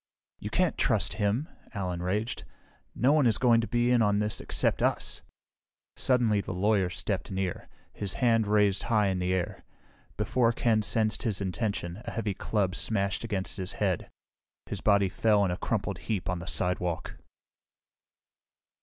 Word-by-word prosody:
"You - - -5
can't - - +1
trust - - +2
him!" 105 +9 +1 0.3
Allen 90 -3 -3
raged. 105 +6 -2 0.5
"No 130 +4 +3
one 150 -5 +4
is 110 - +3
going 120 -3 +4
to 115 - -3
be 120 0 +1
in 120 -2 +4
on 105 -2 +3
this 105 0 -1
except - - 0
us." - - 0 0.7
Suddenly 120 -5 +2
the 95 - -6
lawyer 100 -1 +2
stepped 95 +1 -3
near, 95 -1 -3 0.2
his 100 -2 -3
hand 115 -4 +2
raised 105 -2 +3
high 105 -3 +3
in 95 -1 -1
the 90 0 0
air. 90 -2 -2 0.5
Before 120 -2 +2
Ken 115 -2 +2
sensed 110 0 +1
his 110 -6 -1
intention, 100 -1 -3
a - - -4
heavy 115 -3 -2
club 95 -1 -1
smashed 100 0 -1
against 100 -5 -3
his 95 -1 -3
head. 95 -4 -1 0.6
His - - -6
body 100 -2 +4
fell 105 +1 +2
in 90 - 0
a 90 - -2
crumpled - - -2
heap 90 -6 -2
on 90 - -2
the 85 - -8
sidewalk. 90 -2 -2
105 Hz, 165 wpm, -28 LUFS, 95-115 Hz, 0.7 s, one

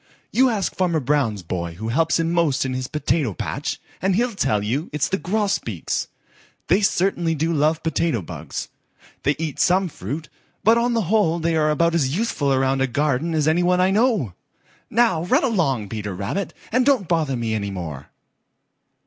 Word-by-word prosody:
You 260 +1 +4
ask 205 -6 -1
Farmer 175 -4 +1
Brown's 130 -8 0
boy 85 -1 -4
who 110 +5 -5
helps 160 +7 +2
him 165 0 0
most 155 -7 +2
in 130 - -2
his 130 0 -3
potato 150 - -1
patch, - - -3 0.2
and 190 0 +2
he'll 240 +3 +1
tell 130 - 0
you 130 - -2
it's 150 -1 0
the 190 - -1
Grosbeaks. 195 - -1 0.6
They 185 +6 +4
certainly 175 -4 +1
do 160 +3 0
love 155 +1 +1
potato 160 - 0
bugs. - - -6 0.5
They 140 +2 +1
eat 155 -3 -4
some 185 +1 +3
fruit, 155 +1 -6 0.4
but 225 +3 +6
on 235 +1 +1
the 225 - +1
whole 190 -3 +2
they 165 0 0
are 155 -1 +2
about 170 +2 +2
as 150 -2 +1
useful 180 -11 0
around 135 0 +2
a 135 - +3
garden 150 +4 0
as 155 -1 +1
any 160 +3 +3
one 180 +1 +2
I 185 +1 +3
know. 210 - +2 0.6
Now 210 -8 +2
run 260 +11 +3
along, 140 - 0
Peter 105 -3 -4
Rabbit, 105 - -3 0.2
and 255 +3 +3
don't 255 -9 +2
bother 155 -6 +1
me 115 -2 -2
any 100 -2 -2
more." 80 -8 -6
160 Hz, 185 wpm, -22 LUFS, 130-185 Hz, 0.6 s, but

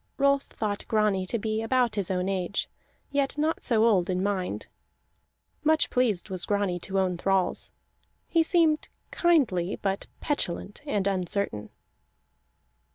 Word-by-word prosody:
Rolf 280 0 +3
thought 205 -2 -3
Grani 210 -4 +1
to 235 - 0
be 220 0 -2
about 245 0 +2
his 200 -4 -1
age, 185 0 -1 0.4
yet 280 0 0
not 310 +2 0
so 225 -3 +3
old 195 -5 +3
in 185 0 0
mind. 195 -2 -2 1.0
Much 315 +1 +3
pleased 225 -8 +2
was 185 -2 -3
Grani 200 -3 0
to 195 +2 -4
own 185 -2 0
thralls. 195 -1 +1 0.6
He 330 - +3
seemed 320 -2 +2 0.2
kindly, 235 - +2
but 195 0 -2
petulant 205 - -2
and 205 -8 0
uncertain. 190 - -1
205 Hz, 130 wpm, -27 LUFS, 185-255 Hz, 1.0 s, Rolf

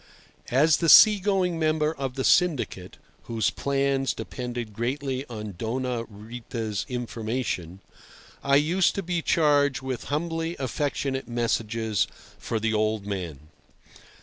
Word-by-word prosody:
As 150 +5 +4
the 165 - +1
sea 210 +4 +9
going 185 -3 0
member 155 -1 +1
of 135 -4 -4
the 135 - -2
syndicate 140 - +1 0.3
(whose 115 -3 0
plans 135 -1 0
depended 120 -3 -5
greatly 130 +4 -3
on 105 -3 -6
Doña 120 +4 -3
Rita's 110 0 -5
information), 115 -7 -3 0.6
I 140 0 +3
used 170 +6 +3
to 195 - -2
be 175 -1 -1
charged 145 -5 +2
with 130 -2 -4
humbly 165 +2 -2
affectionate 135 0 -2
messages 115 -3 0 0.3
for 115 - -2
the 110 +1 0
old 110 -1 0
man. 85 -8 -5
130 Hz, 120 wpm, -26 LUFS, 110-150 Hz, 0.6 s, sea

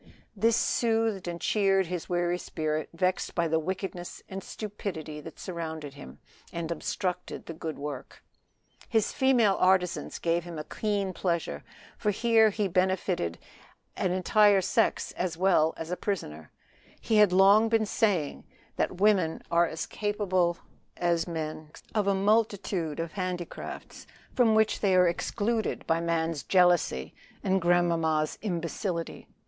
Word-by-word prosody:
This 225 +2 +3
soothed 225 -5 +1
and 170 0 -4
cheered 195 -1 +2
his 175 -1 -5
weary 175 0 0
spirit 155 -2 -3
vexed 185 +2 -1
by 170 -1 +1
the 160 0 +1
wickedness 180 +1 -5
and 190 0 -6
stupidity 175 -8 -6
that - - -11
surrounded 160 -5 -6
him 65 - -11 0.3
and 170 -1 -4
obstructed 180 +1 -3
the 165 - -6
good 160 0 -5
work. 140 -2 -7 0.7
His 220 -3 +1
female 245 -7 +3
artisans 185 -1 +2
gave 170 0 0
him 170 -1 -8
a 150 - -4
keen 200 +1 -2
pleasure, 170 - -2 0.4
for 210 - +1
here 225 +1 +4
he 210 0 -1
benefited 185 - 0 0.6
a 195 +2 +3
sex 190 - +1
as 175 -3 -3
well 175 -4 +3
as 165 +1 -6
a - - 0
prisoner. 80 - -4 0.5
He 220 - +1
had 210 -3 +6
long 200 +4 +6
been 225 -1 +2
saying 200 -9 0 0.3
that 185 - -1
women 190 -6 +2
are 170 0 +4
as 160 0 -4
capable 185 -5 0 0.4
as 170 -1 +1
men 155 -2 -5 0.2
of 210 -2 +1
a 200 - +3
multitude 200 -6 0
of 165 -1 -3
handicrafts, 180 -2 -6 0.3
from 230 -3 +4
which 220 0 +2
they 195 -3 +2
are 180 -1 +6
excluded 220 +6 -1
by 165 0 +1
man's 165 -2 -1
jealousy 175 - +2 0.3
and 190 0 +1
grandmamma's 165 -3 +1
imbecility. 170 -2 -3
180 Hz, 140 wpm, -28 LUFS, 165-205 Hz, 0.7 s, had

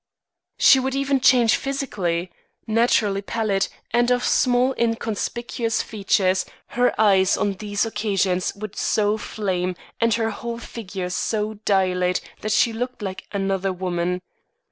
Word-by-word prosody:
She 265 - +7
would 265 +1 -2
even 275 0 +1
change 245 -3 +5
physically. 190 -11 -2 0.3
Naturally 215 -3 +2
pallid 205 -2 0 0.2
and 240 0 +3
of 250 0 +2
small 250 +1 +3
inconspicuous 230 0 -1
features, 190 -3 +1 0.3
her 245 -2 +1
eyes 195 -3 +4
on 205 - 0
these 205 +2 -2
occasions 200 -4 0
would 210 0 -7
so 210 0 +1
flame 185 -4 -2 0.2
and 230 0 +2
her 225 -1 0
whole 235 +2 -5
figure 195 -6 -6
so 215 +2 -2
dilate 180 -2 +2 0.2
that 215 - -3
she 225 +1 +3
looked 245 0 -4
like 190 -1 -6
another 195 -1 -1
woman. 180 0 -2
210 Hz, 130 wpm, -23 LUFS, 190-235 Hz, 0.3 s, She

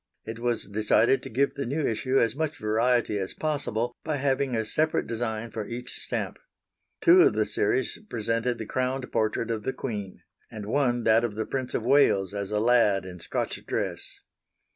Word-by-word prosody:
It 110 +1 -6
was 120 -3 -1
decided 110 +5 +3
to - - -8
give 135 +5 +1
the 140 - -3
new 140 +4 -1
issue 130 +4 0
as 115 +1 +1
much 160 +1 -2
variety 110 0 +1
as 95 - -2
possible 125 -6 -2
by 155 -1 -1
having 135 -2 0
a 110 -1 0
separate 155 +7 0
design 115 -1 -3
for 110 -1 -5
each 120 +1 -6
stamp. - - -3 0.6
Two 360 +1 +7
of 395 - +5
the - - +1
series 405 -1 0
presented 115 +2 -1
the 110 - -5
crowned 130 +3 -2
portrait 110 +1 0
of 110 -2 -2
the 130 - -2
Queen, 105 -7 -5 0.3
and 105 -2 -7
one 120 0 +1
that 110 +1 +4
of 115 -3 -2
the 110 - -2
Prince 130 -2 -3
of - - -1
Wales 115 -7 +3
as 100 -1 -3
a 105 0 0
lad 110 -4 +3
in 90 -1 -9
Scotch 85 - -3
dress. - - -4
115 Hz, 185 wpm, -27 LUFS, 110-135 Hz, 0.6 s, Two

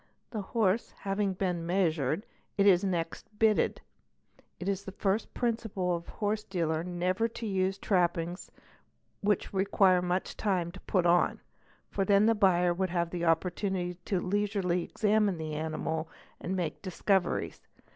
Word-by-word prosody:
The 215 - -3
horse 215 +1 0
having 195 0 0
been 180 -2 -1
measured 165 - 0 0.3
it 200 - +4
is 190 -2 +6
next 170 -4 -2
bitted; 220 -1 +2 0.8
it 180 - -5
is 200 0 -2
a - - -4
first 195 +2 -1
principle 220 -7 -1
of 170 0 -7
a - - -9
horse 210 0 -1
dealer 165 -5 -1
never 180 +5 0
to 230 0 -7
use 190 -1 0
trappings 175 -2 0 0.7
which 205 -1 0
require 190 -1 +4
much 180 +1 -1
time 180 -5 0
to 185 - -11
put 185 -2 0
nm, 175 0 +3 0.5
for 195 - 0
then 200 +1 +4
the 225 - +5
buyer 180 -4 +3
would 185 +1 -1
have 170 -1 -1
an 175 -1 -1
opportunity 180 +2 0
to 190 - 0
leisurely 195 -2 0
examine 210 -3 +1
t 160 -1 -4
e - - -4
animal 160 +1 -3 0.3
and 185 +3 -3
make 175 -4 -3
discoveries. 190 0 -1
185 Hz, 155 wpm, -30 LUFS, 175-200 Hz, 0.8 s, is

